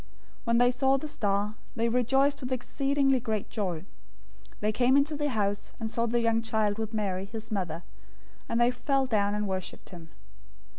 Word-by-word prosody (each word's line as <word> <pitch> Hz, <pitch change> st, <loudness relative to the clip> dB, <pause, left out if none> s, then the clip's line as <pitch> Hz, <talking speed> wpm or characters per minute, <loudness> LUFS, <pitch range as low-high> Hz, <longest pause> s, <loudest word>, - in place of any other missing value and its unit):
002:010 -, -, -24 dB, 0.4 s
When 235 Hz, 0 st, +3 dB
they 245 Hz, +1 st, +5 dB
saw 265 Hz, +2 st, +3 dB
the 305 Hz, -, -5 dB
star, 205 Hz, -6 st, 0 dB, 0.2 s
they 230 Hz, 0 st, +1 dB
rejoiced 270 Hz, +4 st, +2 dB
with 255 Hz, 0 st, -5 dB
exceedingly 270 Hz, +1 st, +1 dB
great 220 Hz, -4 st, -3 dB
joy. 185 Hz, -7 st, -2 dB
002:011 -, -, -16 dB, 0.8 s
They 210 Hz, +1 st, +2 dB
came 250 Hz, +4 st, +4 dB
into 290 Hz, +2 st, +2 dB
the 295 Hz, 0 st, -1 dB
house 205 Hz, -4 st, -1 dB
and 220 Hz, -1 st, -3 dB
saw 235 Hz, 0 st, +1 dB
the 235 Hz, +1 st, +1 dB
young 230 Hz, 0 st, +2 dB
child 220 Hz, -2 st, 0 dB
with 220 Hz, -1 st, -3 dB
Mary, 195 Hz, -4 st, -1 dB
his 220 Hz, +2 st, -8 dB
mother, 175 Hz, -5 st, -2 dB, 0.7 s
and 230 Hz, -, +1 dB
they 240 Hz, +1 st, +5 dB
fell 270 Hz, +2 st, +1 dB
down 205 Hz, -4 st, +1 dB
and 210 Hz, 0 st, -1 dB
worshiped 190 Hz, -1 st, -4 dB
him. 170 Hz, -3 st, -11 dB
230 Hz, 190 wpm, -29 LUFS, 205-255 Hz, 0.8 s, they